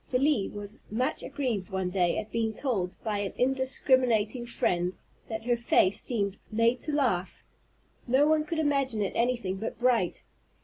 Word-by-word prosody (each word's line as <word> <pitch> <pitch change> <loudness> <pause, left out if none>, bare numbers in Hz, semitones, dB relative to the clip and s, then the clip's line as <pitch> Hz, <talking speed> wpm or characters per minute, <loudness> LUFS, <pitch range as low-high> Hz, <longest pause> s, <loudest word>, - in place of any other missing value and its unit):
Felie 255 -4 +2
was 205 +1 -7
much 255 +7 -1
aggrieved 250 -9 -2
one 190 -1 -2
day 180 -2 +2
at 215 0 -4
being 225 -1 0
told, 200 -10 -1
by 210 -2 -1
an 200 -1 -3
indiscriminating 255 -3 +2
friend, 180 -5 0 0.3
that 225 0 -4
her 240 0 +3
face 230 -5 +2
"seemed 200 -5 -2
made 230 +3 +2
to 305 - -3
laugh, 245 -11 0 0.6
no 260 +4 +4
one 310 0 +3
could 315 +2 -4
imagine 275 -8 +1
it 195 - -2
anything 235 -6 0
but 220 +3 -4
bright." 235 -6 +1
230 Hz, 160 wpm, -28 LUFS, 200-260 Hz, 0.6 s, no